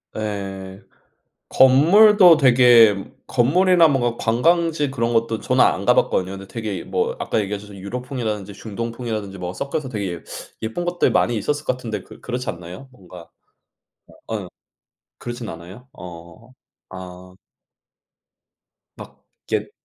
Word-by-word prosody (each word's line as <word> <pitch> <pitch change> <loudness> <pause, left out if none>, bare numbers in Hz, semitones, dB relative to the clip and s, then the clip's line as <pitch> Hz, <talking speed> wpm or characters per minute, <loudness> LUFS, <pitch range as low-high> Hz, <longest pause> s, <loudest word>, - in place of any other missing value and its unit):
예. 95 -2 -6 0.7
건물도 175 +7 +6
되게 120 -6 +6 0.3
건물이나 170 +7 +4
뭔가 120 -5 0
관광지 155 +5 +1
그런 120 -3 -1
것도 115 -1 0
저는 - - +3
안 - - 0
가봤거든요. 95 +1 +2
근데 95 0 -9
되게 105 -6 -5
뭐 - - -2
아까 - - -1
얘기하시던 105 0 -6
유럽풍이라든지 110 -1 -5
중동풍이라든지 110 -2 -6
뭐 90 0 -5
섞여서 140 +7 -4
되게 100 -7 -4
예 85 - -10 0.4
예쁜 115 +11 -4
것들 175 0 0
많이 120 - +1
있었을 145 +8 -2
거 130 - 0
같은데 115 -4 -6
그 - - -15
그렇지 125 +1 -4
않나요? 90 +9 -10
뭔가 90 -8 -14 1.0
어 110 - -3
응. 95 -3 -7 0.7
그렇진 120 -1 -7
않아요? 90 +10 -11
어. 85 +6 -12 0.4
아. 90 0 -11 1.6
막 - - -13 0.3
옛 - - -1
115 Hz, 285 characters per minute, -21 LUFS, 95-130 Hz, 1.6 s, 건물도